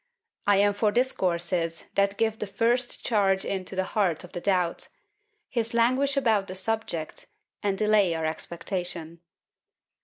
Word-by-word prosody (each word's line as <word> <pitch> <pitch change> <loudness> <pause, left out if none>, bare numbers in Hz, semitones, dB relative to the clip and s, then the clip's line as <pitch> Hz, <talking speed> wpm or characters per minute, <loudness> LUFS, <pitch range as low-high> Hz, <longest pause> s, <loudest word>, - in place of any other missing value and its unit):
I 205 -1 +5
am 205 +1 +4
for 205 +1 +2
discourses 175 -8 0
that 200 0 +2
give 220 -1 0
the 210 - -3
first 240 +4 0
charge 195 -4 +2
into 190 -1 -3
the 190 - +1
heart 185 -4 0
of 180 - -11
the 175 - -5
doubt; 180 -3 +1 0.6
his 230 -2 -2
languish 260 +4 +3
about 220 -7 +2
the 185 - -6
subject, 190 -6 -3 0.3
and 200 -1 0
delay 210 -5 +3
our 160 -1 -2
expectation. 170 +1 -4
200 Hz, 145 wpm, -27 LUFS, 175-225 Hz, 0.6 s, I